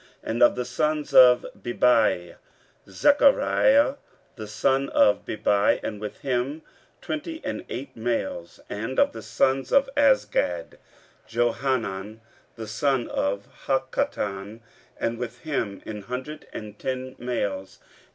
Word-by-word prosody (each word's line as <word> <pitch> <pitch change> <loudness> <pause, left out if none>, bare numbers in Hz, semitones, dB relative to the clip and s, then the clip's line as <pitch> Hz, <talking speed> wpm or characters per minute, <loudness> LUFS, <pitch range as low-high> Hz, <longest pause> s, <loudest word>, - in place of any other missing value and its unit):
15:008:011 - - -3
And 115 +2 -2
of 120 - +6
the 125 - -3
sons 150 +5 -1
of 125 -1 +7 0.2
Bebai; 115 -8 +2 0.5
Zechariah 280 - +4 0.4
the 110 -3 -7
son 135 +6 +1
of 105 - +3
Bebai, 105 -1 +2
and 105 -1 -5
with 105 - -7
him 135 +3 -2 0.4
twenty 320 +1 -4
and - - -3
eight 130 +1 -6
males. 110 -7 -3
15:008:012 105 - -4
And 130 +3 -2
of - - +4
the 115 - -8
sons 130 +5 0
of 275 0 +4
Azgad; 265 - +1 0.5
Johanan 115 -3 -1 0.3
the 110 -1 -7
son 125 +3 0
of 100 +1 -2 0.2
Hakkatan, 100 +2 -2 0.4
and 115 0 -2
with 125 -2 -6
him 120 -11 -3
an 105 -1 -6
hundred 130 +8 -7
and 105 -1 -8
ten 130 0 -4
males. 100 -6 -3
120 Hz, 130 wpm, -25 LUFS, 105-135 Hz, 0.5 s, of